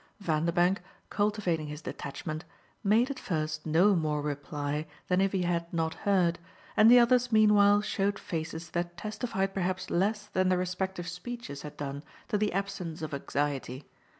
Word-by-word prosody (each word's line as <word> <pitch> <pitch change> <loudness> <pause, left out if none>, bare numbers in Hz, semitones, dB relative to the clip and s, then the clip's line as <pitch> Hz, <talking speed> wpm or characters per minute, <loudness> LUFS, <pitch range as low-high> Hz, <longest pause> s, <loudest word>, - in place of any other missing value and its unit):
Vanderbank, 175 +1 +1 0.3
cultivating 205 -7 0
his 150 +1 -7
detachment, 155 +3 -5 0.4
made 225 +6 +3
at 270 - -6
first 155 -3 -3
no 180 +6 +5
more 155 -3 0
reply 145 +1 -3 0.2
than 180 +1 +3
if 195 0 +2
he 190 -2 0
had 170 -1 -1
not 160 -1 0
heard, 180 -4 +1 0.4
and 215 +1 +7
the 245 - +9
others 245 0 +4
meanwhile 205 -2 +6
showed 205 -1 0
faces 160 -1 -5
that 175 0 -3
testified 210 -1 -2
perhaps 185 0 -2
less 205 +4 +1
than 185 -2 +1
their 185 - +3
respective 180 0 -2
speeches 180 -4 -6
had 150 - -9
done 140 0 -4 0.3
to 225 - 0
the 210 0 +1
absence 185 -4 -3
of 155 - -4
anxiety. 140 -1 -2
180 Hz, 155 wpm, -29 LUFS, 155-205 Hz, 0.4 s, the